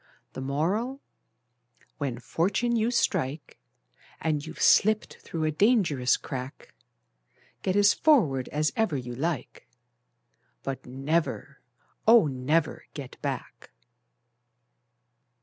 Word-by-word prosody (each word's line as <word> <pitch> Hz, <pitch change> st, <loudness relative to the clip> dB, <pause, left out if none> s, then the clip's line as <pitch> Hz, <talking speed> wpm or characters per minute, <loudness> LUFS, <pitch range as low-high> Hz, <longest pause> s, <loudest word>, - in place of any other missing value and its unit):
The -, -, -6 dB
Moral: 185 Hz, -, -1 dB, 1.0 s
When 135 Hz, -5 st, -2 dB
fortune 190 Hz, -, 0 dB
you 225 Hz, 0 st, +2 dB
strike, 150 Hz, -, -1 dB, 0.6 s
And 150 Hz, -2 st, -1 dB
you've 160 Hz, +1 st, -9 dB
slipped 215 Hz, +1 st, +3 dB
through 165 Hz, -2 st, -4 dB
a 155 Hz, -, +1 dB
dangerous 155 Hz, -, +3 dB
crack, 130 Hz, +1 st, -7 dB, 0.9 s
Get 185 Hz, -, 0 dB
as 205 Hz, 0 st, +5 dB
forward 160 Hz, -, +3 dB
as 150 Hz, +1 st, 0 dB
ever 220 Hz, -10 st, +1 dB
you 125 Hz, -1 st, -6 dB
like, 145 Hz, +1 st, -4 dB, 1.0 s
But 135 Hz, -2 st, -5 dB
never, 140 Hz, +2 st, -2 dB, 0.5 s
oh, 230 Hz, -3 st, +8 dB
never 140 Hz, +4 st, 0 dB
get 140 Hz, -4 st, -9 dB
back! -, -, -5 dB
155 Hz, 100 wpm, -27 LUFS, 135-205 Hz, 1.0 s, oh